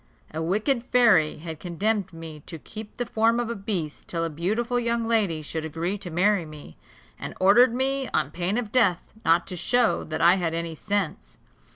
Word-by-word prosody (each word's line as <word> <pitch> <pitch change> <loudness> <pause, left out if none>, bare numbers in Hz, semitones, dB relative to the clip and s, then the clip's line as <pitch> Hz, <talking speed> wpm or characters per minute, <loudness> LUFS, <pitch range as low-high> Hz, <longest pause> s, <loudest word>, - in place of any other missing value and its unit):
A 160 - -3
wicked 215 - +1
fairy 230 -12 +4
had 160 0 -7
condemned 190 +3 -1
me 165 -2 -9
to 165 - -6
keep 215 +7 -10
the 245 - -2
form 230 +1 +2
of 235 -1 -2
a - - -3
beast 195 -7 -3
till 165 -1 -2
a 165 - -2
beautiful 220 +10 -1
young 235 -1 -1
lady 200 -9 +1
should 160 +1 -4
agree 165 +5 -2
to 180 - -6
marry 190 +3 +2
me, 150 - -11 0.4
and - - -6
ordered 235 +6 +5
me, 265 +1 0
on 140 - 0
pain 180 +6 -1
of 230 -4 -3
death, 210 -9 +1
not 165 +1 +3
to 185 - -5
show 245 +7 +2
that 155 0 -4
I 175 +3 +5
had 165 -3 -1
any 165 0 -3
sense. 160 - -3
190 Hz, 195 wpm, -25 LUFS, 165-230 Hz, 0.4 s, ordered